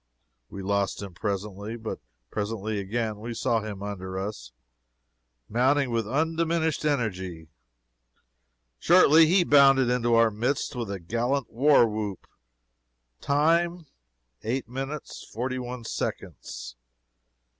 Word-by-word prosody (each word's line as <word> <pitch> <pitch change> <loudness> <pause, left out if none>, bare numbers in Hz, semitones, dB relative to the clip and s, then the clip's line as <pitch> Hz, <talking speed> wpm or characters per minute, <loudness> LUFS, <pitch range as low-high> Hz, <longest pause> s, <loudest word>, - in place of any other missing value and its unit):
We 100 - -7
lost 100 +1 -1
him 100 -3 -8
presently. 100 +3 -4
But 110 -1 -5 0.3
presently 105 0 -3
again 110 +2 -2
we 115 +2 -6
saw 115 -1 +1
him 100 -2 -6
under 95 -2 -5
us, 95 - -5 1.0
mounting 130 +3 +2
with 115 -2 -1
undiminished 160 +2 0
energy. 95 - -2 1.3
Shortly 165 -2 +6
he 180 +2 +4
bounded 135 -5 +5
into 120 -1 +2
our 115 -1 +5
midst 125 +7 -1
with 120 -4 -4
a 100 -1 -4
gallant 120 +9 -1
war 135 0 +5
whoop. 105 -3 -4 0.9
Time, 170 +4 +1 0.6
eight 120 +2 -2
minutes, 135 +4 -6
forty 130 +3 -3
one 125 -1 -6
seconds. - - -5
115 Hz, 115 wpm, -26 LUFS, 100-140 Hz, 1.3 s, Shortly